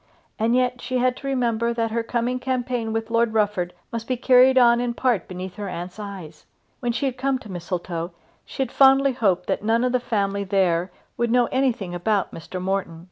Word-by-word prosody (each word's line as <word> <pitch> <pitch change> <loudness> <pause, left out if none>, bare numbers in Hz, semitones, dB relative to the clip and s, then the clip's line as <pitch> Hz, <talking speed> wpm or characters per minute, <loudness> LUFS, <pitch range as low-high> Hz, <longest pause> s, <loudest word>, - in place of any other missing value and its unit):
And 230 +2 +2
yet 250 -1 +1
she 255 - -2
had 250 0 +2
to 275 - -7
remember 235 -3 0
that 225 -1 -1
her 230 +1 0
coming 240 +2 -1
campaign 245 -3 -2
with 225 0 -3
Lord 230 -1 +2
Rufford 205 -5 +1 0.2
must 230 -1 -5
be 255 - -1
carried 260 +1 +5
on 240 -1 +6
in 240 -1 -2
part 240 -9 0
beneath 185 +1 -7
her 205 -2 -4
aunt's 180 +3 -6
eyes. 190 -7 -9 0.3
When 240 -2 -1
she 260 +4 -2
had 255 -2 -2
come 270 0 +1
to 220 -5 -11
Mistletoe 175 -1 -4 0.3
she 270 - -3
had 255 - -7
fondly 270 0 +5
hoped 190 -7 +1
that - - -1
none 225 +3 +2
of 250 - +1
the 250 - +2
family 200 -4 -1
there 185 -2 +1 0.3
would 235 0 0
know 245 +1 +4
anything 250 -9 0
about 195 +2 0
Mr. 175 +3 -7
Morton. 185 -3 -2
230 Hz, 205 wpm, -23 LUFS, 195-250 Hz, 0.3 s, on